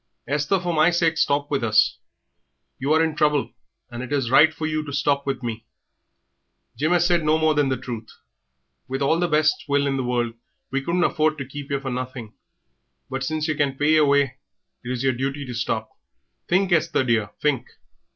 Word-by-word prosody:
Esther, 150 +7 0
for 175 -1 -2
my 155 +1 +4
sake 170 -2 +1
stop 145 -2 +1
with 140 -3 0
us. 110 -1 +3 0.8
You 135 +3 -1
are 160 +1 +4
in 160 -2 -1
trouble, 150 -2 +1 0.4
and 120 0 -6
it 130 - -7
is 135 -5 0
right 155 +4 +7
for 160 0 -5
you 155 0 -1
to 145 - -7
stop 140 0 0
with 135 -2 -2
me. 115 -1 -4 1.1
Jim 155 +4 0
'as 175 -1 +3
said 175 -2 +2
no 155 +1 +3
more 160 0 +3
than 145 -2 +2
the 130 - 0
truth. 120 -3 -7 0.8
With 135 +1 -2
all 160 +4 +2
the 175 - +1
best 155 -1 +2
will 140 0 +2
in 135 -1 0
the 130 - -1
world 120 -2 -1 0.4
we 135 0 0
couldn't 170 +5 0
afford 155 -2 +1
to 140 - -5
keep 140 +2 -8
yer 140 -1 -1
for 135 -1 -5
nothing, 125 -3 -5 0.8
but 135 0 -3
since 155 +3 -2
yer 155 - +1
can 145 -3 -1
pay 150 +2 +3
yer 155 -1 +5
way, 140 -2 +2 0.4
it - - -7
is 125 0 -2
yer 135 - +3
duty 135 +3 -3
to 125 - -6
stop. 115 -2 -2 0.6
Think, 185 +1 +2
Esther, 160 -5 +2
dear, 115 -5 +1
think. 140 -5 0
140 Hz, 205 wpm, -23 LUFS, 130-155 Hz, 1.1 s, right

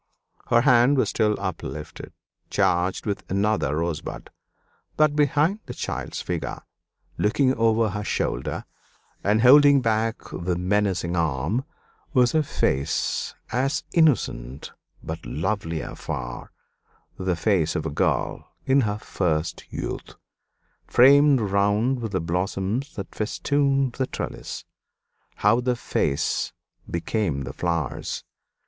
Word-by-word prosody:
Her 115 - +4
hand 125 +1 +5
was 130 - +2
still 105 -2 +1
uplifted, 75 0 -6 0.4
charged 90 +2 +1
with 100 -2 -2
another 100 -6 +1
rosebud; 85 -1 -4 0.7
but 155 -1 +4
behind 150 +7 +2
the - - -6
child's - - -4
figure, - - -4 0.6
looking 130 +5 +3
over 115 -2 +2
her 105 +2 -4
shoulder - - -2 0.6
and 105 +3 +2
holding 140 +2 +8
back 115 -1 0
the 90 0 -2
menacing 90 -2 0
arm, 85 - 0 0.5
was 125 -2 +4
a 160 - +4
face 70 - -1 0.2
as 130 +4 0
innocent 75 - +1 0.3
but 80 +1 -6
lovelier 80 - -3
far - - -6 0.7
the 95 -1 0
face 85 -3 +1
of 75 - -2
a 80 - -2
girl - - -1
in 135 +1 +4
her 105 -3 -1
first 85 -6 -2
youth, - - -5 0.7
framed 140 +2 +6
round 105 +5 +1
with 115 -3 -4
the 95 - +1
blossoms 95 - -2
that 100 - -7
festooned 135 +3 +1
the 130 +1 -1
trellis. - - -6 0.7
How 105 +4 +3
the 125 0 +1
face 70 -10 -1 0.4
became 85 -5 -1
the - - -6
flowers! 85 -6 -2
105 Hz, 115 wpm, -24 LUFS, 85-130 Hz, 0.7 s, holding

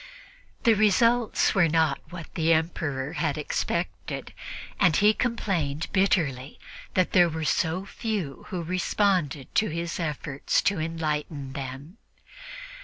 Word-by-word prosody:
The 230 -3 +6
results 225 +3 +3
were 175 -4 +4
not 160 -3 +2
what 170 -2 -9
the 165 0 +2
Emperor 160 -4 -1
had 145 -3 -1
expected, 150 - -3 0.5
and 160 - +4
he 210 +1 +5
complained 170 - -1
bitterly 155 -9 +1 0.4
that 185 -1 +2
there 175 -2 +5
were 160 0 -3
so 165 +5 0
few 200 - -4
who 180 -4 -3
responded 180 -5 0
to 215 - +2
his 170 +2 -3
efforts 150 -3 -1
to 200 -4 +1
enlighten 150 -3 -3
them. 140 - -7
165 Hz, 120 wpm, -26 LUFS, 150-190 Hz, 0.5 s, The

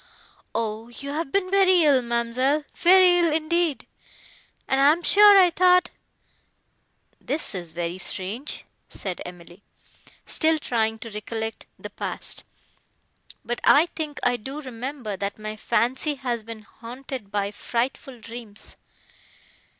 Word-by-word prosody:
"O 220 0 -2
you 270 +4 -7
have 300 -1 -3
been 380 -2 0
very 375 -3 +5
ill, 280 -4 +5
ma'amselle,—very 285 +10 +3
ill 335 -2 +3
indeed! 315 -3 0 0.8
and 270 0 +2
I 280 +2 +7
am 345 +2 -6
sure 410 +1 +8
I 360 -2 +5
thought—" 360 0 +4 1.3
"This 300 -4 -3
is 175 -4 -7
very 170 +2 -4
strange!" 205 +10 -5 0.2
said 185 -3 -5
Emily, 175 +1 -13 0.6
still 320 0 +2
trying 225 -6 -1
to 225 0 -9
recollect 220 +1 -5
the - - -9
past.—"But 240 - -7
I 295 +3 +6
think 305 -2 -4
I 245 0 +2
do 270 +6 -7
remember, 255 -4 -5
that 200 +1 -4
my 215 0 -6
fancy 255 +7 0
has 245 -4 -3
been 225 0 -9
haunted 245 0 -9
by 200 -1 -1
frightful 245 +3 -3
dreams. 225 -2 -8
250 Hz, 125 wpm, -24 LUFS, 220-310 Hz, 1.3 s, sure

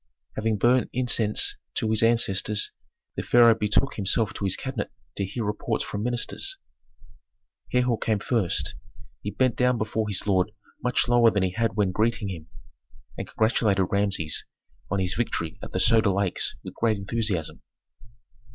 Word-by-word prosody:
Having 110 0 0
burnt 120 +4 +3
incense 115 -4 +1 0.2
to - - 0
his 110 - +2
ancestors, 105 -3 +2 0.4
the - - -2
pharaoh 120 -1 +6
betook 110 +4 0
himself 105 +2 +2
to 100 - -4
his 95 - +2
cabinet - - -4 0.3
to 100 - -2
hear 105 +5 -4
reports 105 - -2
from 100 - -5
ministers. 125 - -1 1.1
Herhor 125 -2 +1
came 110 -2 +1
first. 105 -3 0 0.5
He 105 - -3
bent 130 +2 +1
down 125 -1 +2
before 110 0 -2
his 100 -2 +1
lord 100 0 +1 0.3
much 125 0 +1
lower 120 -1 +5
than 100 -3 0
he 95 - 0
had 115 +1 -1
when 100 -3 +1
greeting 110 +1 0
him, 85 -4 -7 0.7
and - - -6
congratulated 110 -4 +2
Rameses 100 -6 0 0.5
on 100 - -1
his 90 -1 0
victory 85 -9 -2
at - - -8
the - - -2
Soda 110 -3 +4
Lakes 95 -7 0
with - - -8
great 110 -2 +1
enthusiasm. 100 -5 -1
110 Hz, 155 wpm, -25 LUFS, 100-115 Hz, 1.1 s, pharaoh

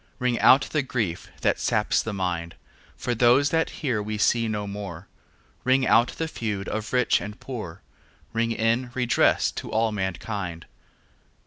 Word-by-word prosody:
Ring 125 -1 0
out 130 +3 +7
the 155 - +2
grief 115 -10 -3
that - - +1
saps - - +1
the 110 - -4
mind, 90 -4 -3 0.4
For 120 - -2
those 125 +4 +4
that 165 0 +1 0.2
here 120 -6 +1
we 105 +1 -4
see 115 +2 +2
no 105 -1 -2
more, 100 -3 -7 0.6
Ring 130 +1 +3
out 120 0 +5
the 160 - -3
feud 105 -9 -4
of 110 0 -4
rich 125 -1 +3
and 105 +2 -7
poor, 105 -8 -7 0.5
Ring 115 0 0
in 115 +3 +1
redress 125 -2 +2
to - - -7
all 110 0 +1
mankind. 95 -3 -4
110 Hz, 155 wpm, -25 LUFS, 100-125 Hz, 0.6 s, out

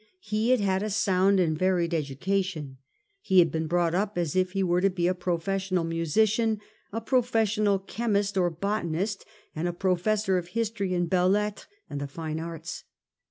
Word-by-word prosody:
He 215 -6 -1
had 255 -1 +4
had 190 -1 +1
a 215 - -2
sound 195 -1 +3
and 160 -4 +2
a - - -9
varied 180 -2 +1
education. 155 -1 -2 0.4
He 190 - +1
had 170 -4 +6
been 160 +1 -2
brought 170 0 +1
up 200 +2 -1
as 170 -3 -1
if 185 0 +1
he 195 -1 +1
were 175 0 +2
to 195 - +4
be 180 -2 -1
a 180 - +3
professional 185 +1 -1
musician, 210 +7 +1 0.3
a 225 - -2
professional 225 -4 +2
chemist 200 0 -1
or 180 -2 +3
botanist, 195 +2 -2 0.3
and 160 +3 -1
a 175 - -2
professor 190 +2 +1
of 170 - -8
history 210 -2 -2
and 175 -1 0
belles 180 +2 +3
lettres 210 0 -2 0.2
and 145 - -5
the 145 - -3
fine 155 +2 -5
arts. 165 +1 -6
185 Hz, 180 wpm, -27 LUFS, 170-205 Hz, 0.4 s, had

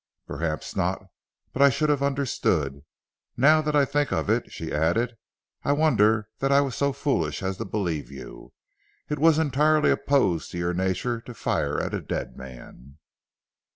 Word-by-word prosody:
"Perhaps 80 -2 -4
not; - - -1 0.5
but 135 - -2
I 140 - +8
should 150 +4 0
have 145 -2 +2
understood. 110 - 0 0.6
Now 155 +5 +5
that 150 -1 -1
I 145 -1 +5
think 145 +1 0
of 100 - 0
it," 115 +2 -1
she 80 -1 -6
added, 110 +11 +1 0.5
"I 140 - +2
wonder 110 -8 +3
that 135 0 0
I 140 - +6
was 140 -3 0
so 140 0 +1
foolish 105 - -1
as 95 0 -2
to - - -4
believe 90 -7 -3
you. 70 -2 -11 0.6
It 150 - -2
was 160 0 +5
entirely 150 0 +3
opposed 100 - +1
to - - -4
your 85 0 -1
nature 95 +6 -1
to 120 0 -11
fire - - -1
at - - -3
a - - -2
dead - - -4
man." 65 +1 -12
120 Hz, 170 wpm, -25 LUFS, 85-140 Hz, 0.6 s, I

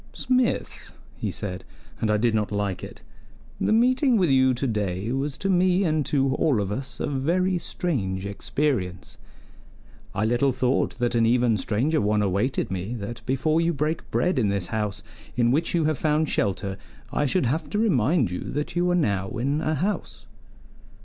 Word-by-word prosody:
"Smith," 255 -1 -1 0.2
he - - -3
said 95 -2 -4 0.4
and 110 - 0
I 105 - +3
did 115 +1 +2
not 105 -2 0
like 100 -3 -2
it - - -10 0.6
"the - - +1
meeting 250 +3 +4
with 180 -7 +3
you 130 -1 +4
today 105 -5 -2
was 135 +2 -2
to 195 - -3
me 185 0 +3
and 155 -4 +1
to 135 -2 +2
all 145 -9 +2
of 100 -1 -2
us 130 +6 -5
a - - -1
very 175 +7 0
strange 100 - -2
experience: 100 - -2 1.0
I 105 - +1
little 120 +4 +2
thought 130 +1 0
that 120 -1 0
an 115 -1 +3
even 120 -1 +3
stranger 120 - 0
one 105 0 +2
awaited 100 +7 0
me, 95 +6 -3
that 115 +2 -6
before 155 +5 +1
you 170 0 +1
break 155 +3 -2
bread 180 -6 +1
in 105 -4 +2
this 100 -2 -1
house 105 -2 -2 0.3
in 120 -1 +3
which 155 +6 +1
you 165 -2 +2
have 155 -3 0
found 155 0 +2
shelter, 100 -1 -1 0.4
I 145 - +1
should 180 +2 +1
have 140 +7 -1
to 210 - -2
remind 150 - +2
you 90 - -4
that 150 +4 -3
you 175 +1 +2
are 175 - +3
now 100 - 0
in 140 +6 0
a 155 0 0
house." 190 +8 -3
130 Hz, 180 wpm, -25 LUFS, 105-160 Hz, 1.0 s, meeting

